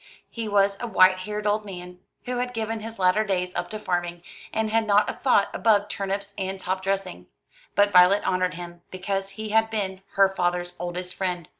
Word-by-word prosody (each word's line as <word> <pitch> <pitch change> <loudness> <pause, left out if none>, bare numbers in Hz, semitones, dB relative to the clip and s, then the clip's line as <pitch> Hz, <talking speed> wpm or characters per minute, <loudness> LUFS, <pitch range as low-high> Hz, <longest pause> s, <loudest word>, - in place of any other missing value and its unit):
He 230 -2 -4
was 200 -1 +2
a 240 - -3
white 185 -3 +5
haired 210 +2 -5
old 210 +1 +1
man, 180 -2 -9 0.3
who 250 0 -2
had 245 0 -2
given 225 0 -2
his 225 +1 -8
latter 185 +3 +3
days 180 -3 -1
up - - -3
to 215 - -5
farming, 175 -4 -2 0.3
and 220 -1 -1
had 225 0 +2
not 205 0 +4
a - - -2
thought 245 -7 +2
above 205 -2 +2
turnips 200 +1 -3
and 190 0 -3
top 185 0 -2
dressing; 195 -1 -3 0.5
but 205 0 +4
Violet 180 +2 +6
honoured 185 0 +1
him, 175 0 -9
because 195 +1 -3
he 215 0 -4
had 225 +1 +3
been 195 -4 -3
her 195 0 +5
father's 175 -2 -1
oldest 180 +1 -4
friend. 180 -4 -3
195 Hz, 195 wpm, -25 LUFS, 180-215 Hz, 0.5 s, Violet